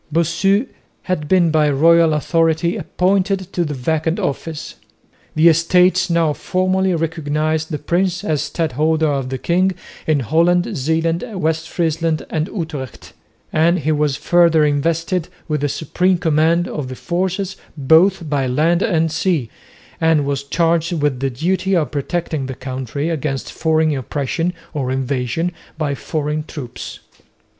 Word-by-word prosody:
Bossu 170 - +2 0.4
had 170 -5 -2
been 175 -2 +3
by 155 -1 +3
royal 165 +2 +4
authority 165 +2 +1
appointed 190 0 0
to 175 - +1
the 150 -3 -3
vacant 160 +5 -1
office. 155 +2 -4 0.6
The 155 +2 +5
Estates 180 +3 +4
now 165 -3 +2
formally 185 +2 0
recognised 155 -1 -1
the 155 - -2
prince 175 +3 -1
as 155 -3 0
Stadholder 160 0 0
of 135 -3 -1
the 130 - -3
king 185 +7 +1 0.3
in 155 -3 +2
Holland, 175 - +2
Zeeland, 160 +3 0 0.2
West 160 0 -1
Friesland 165 -1 -1
and 155 +1 -1
Utrecht; 155 - -6 0.4
and 165 +3 +3
he 155 -1 -1
was 150 -2 +1
further 165 +1 +4
invested 165 +4 0 0.2
with 150 -3 -1
the 145 - 0
supreme 180 +5 0
command 165 +1 +2
of 150 -4 -4
the 130 - -6
forces 185 +4 -2 0.2
both 165 +5 +4
by 140 -3 0
land 160 +7 +2
and 165 -5 +1
sea 160 -7 0 0.5
and 160 -3 +3
was 140 -1 -1
charged 165 +3 +1
with 145 -5 0
the 135 +1 0
duty 185 +8 0
of 160 -4 0
protecting 150 -1 -2
the 130 - -5
country 130 +3 -4
against 145 -4 -3
foreign 160 -1 +1
oppression 145 +6 -2 0.2
or 135 -4 -2
invasion 130 +5 -1 0.3
by 150 -3 -1
foreign 150 +1 -3
troops. 135 -6 -8
160 Hz, 140 wpm, -19 LUFS, 145-170 Hz, 0.6 s, The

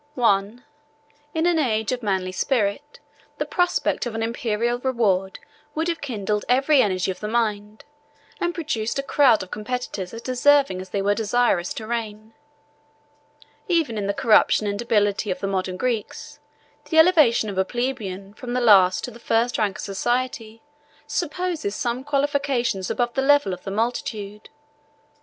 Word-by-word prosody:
—I. 205 -2 +2 0.8
In 320 +1 +1
an 345 -2 +3
age 220 -6 0
of 250 -1 -2
manly 190 -4 -1
spirit, 240 +7 -1 0.4
the - - -2
prospect 355 -7 0
of 230 - -6
an 225 - -2
Imperial 235 +1 -1
reward 210 -7 0 0.4
would 320 +2 -1
have 335 - -3
kindled 210 -6 -2
every 270 +3 +4
energy 185 -3 0
of 180 - -8
the 210 - -4
mind, 215 -2 -2 0.5
and 350 0 -1
produced 275 - -2
a 275 - -1
crowd 270 -7 +4
of 185 - -13
competitors 215 -4 -4
as 230 +1 -9
deserving 260 -5 +3
as 185 - -10
they 195 +1 -2
were 205 +1 +3
desirous 220 -4 +1
to 220 - -6
reign. 220 -1 -5 1.3
Even 330 - +1
in 205 -2 -2
the 200 - 0
corruption 215 -1 +4
and 205 0 -2
debility 210 -3 +1
of 185 -1 -2
the - - -3
modern 190 -1 -2
Greeks, 255 +6 -4 0.5
the 320 +2 -2
elevation 310 -10 +5
of 195 -2 -3
a - - +4
plebeian 205 -5 -4
from 240 +3 -7
the 250 - +1
last 195 -6 +5
to - - -5
the 235 - -13
first 230 +1 0
rank 210 -2 0
of - - -7
society, 230 +2 -2 0.4
supposes 340 - -2
some 245 +2 -2
qualifications 275 -7 0
above 240 -1 -1
the 270 - 0
level 285 -7 +3
of 180 - -7
the - - -3
multitude. 210 -1 -3
230 Hz, 160 wpm, -23 LUFS, 205-260 Hz, 1.3 s, elevation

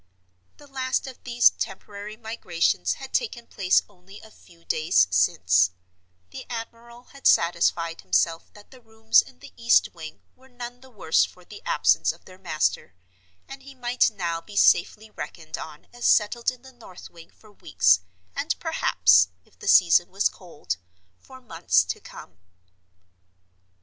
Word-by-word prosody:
The 295 - -16
last 265 -1 -2
of 265 -2 -11
these 240 -1 +4
temporary 205 +2 -7
migrations 175 - -1
had 270 - -10
taken 250 - -2
place 185 -5 +1
only 195 0 -16
a 220 - -16
few 170 -4 -22
days 155 - +2
since; 90 -1 +3 0.6
the - - -8
admiral 235 +1 -8
had 275 - -1
satisfied 170 -1 +2
himself 165 - 0
that 205 0 -18
the 260 -2 -16
rooms 220 0 +3
in - - -17
the 90 - -15
east 95 -5 +3
wing 155 +7 -11
were 260 +1 -22
none 245 0 -9
the 265 - -16
worse 195 -9 +1
for 180 -1 -8
the 205 - -12
absence - - +2
of - - -19
their 185 0 -15
master, 150 - -2 0.5
and 270 0 -10
he 275 0 -14
might 245 0 +1
now 170 -5 -4
be 205 +4 -14
safely 215 +4 +3
reckoned 155 -1 -8
on 150 -1 -10
as 240 0 -2
settled 230 +3 +2
in 255 -1 -9
the 265 0 -15
north 220 -7 -14
wing 170 -1 -15
for 215 - -21
weeks, 95 - +2 0.4
and - - -1
perhaps, 90 - +3 0.2
if - - -29
the - - -9
season 175 -2 +5
was 195 +2 +1
cold, 165 - -7 0.4
for 260 - -15
months 165 - +1
to 90 - -5
come. 85 - -13
200 Hz, 160 wpm, -24 LUFS, 165-240 Hz, 0.6 s, season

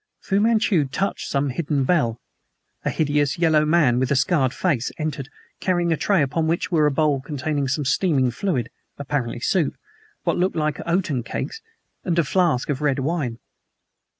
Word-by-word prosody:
Fu 195 -1 0
Manchu 210 -7 +3
touched 190 +9 -2
some 140 0 0
hidden 145 0 -1
bell. 125 -7 +1 0.6
A - - 0
hideous 145 -2 0
yellow 160 -3 +3
man 150 -6 +3
with 130 -1 0
a 140 - +2
scarred 135 -2 +2
face 140 -7 -1
entered, 150 -3 -4 0.3
carrying 175 -2 +1
a - - +2
tray 190 0 +2
upon 160 +4 -1
which 165 +3 -1
were 155 -3 +4
a - - +1
bowl 145 -1 +1
containing 145 0 -2
some 135 +2 -1
steaming 135 -4 +2
fluid, 125 - -2 0.3
apparently 135 -4 -3
soup, 165 +3 0 0.5
what - - 0
looked 185 +2 +1
like 155 -2 -1
oaten 170 -7 0
cakes, 450 - -5 0.4
and 175 -2 -1
a 170 - +4
flask 160 -4 +1
of 140 -1 -1
red 145 -3 +1
wine. 135 -4 -2
150 Hz, 170 wpm, -23 LUFS, 135-170 Hz, 0.6 s, were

